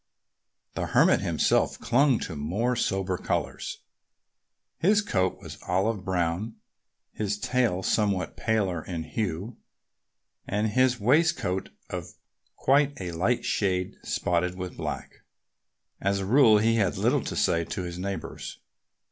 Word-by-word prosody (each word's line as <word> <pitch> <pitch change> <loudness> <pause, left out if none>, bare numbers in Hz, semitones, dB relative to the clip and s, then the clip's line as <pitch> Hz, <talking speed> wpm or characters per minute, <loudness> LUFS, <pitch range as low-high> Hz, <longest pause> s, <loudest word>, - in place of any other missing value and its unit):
The - - -2
Hermit - - +4
himself - - +1
clung 130 +1 +3
to 80 - -5
more 100 +13 -1
sober 95 -4 -1
colors. - - -3 1.0
His 205 +5 +4
coat 95 - 0
was - - -10
olive 95 +3 0
brown, 90 +3 -1 0.6
his 105 -1 -2
tail 115 -5 0
somewhat 100 -6 0
paler 100 -7 0
in 85 -3 -4
hue, 100 +4 -3 0.9
and 105 +2 0
his 125 +2 +2
waistcoat 120 - +2 0.2
of - - -6 0.4
quite 140 +1 +2
a 90 -2 -4
light 95 +9 0
shade, 95 -3 0
spotted 90 +1 0
with 90 -1 -6
black. - - -5 0.8
As 100 +1 +1
a 95 - -2
rule 115 0 +6
he 115 +2 +3
had 95 -5 +1
little - - +2
to - - -4
say 85 0 +2
to 95 - -4
his 90 0 -6
neighbors. 100 +1 -5
100 Hz, 130 wpm, -27 LUFS, 90-115 Hz, 1.0 s, rule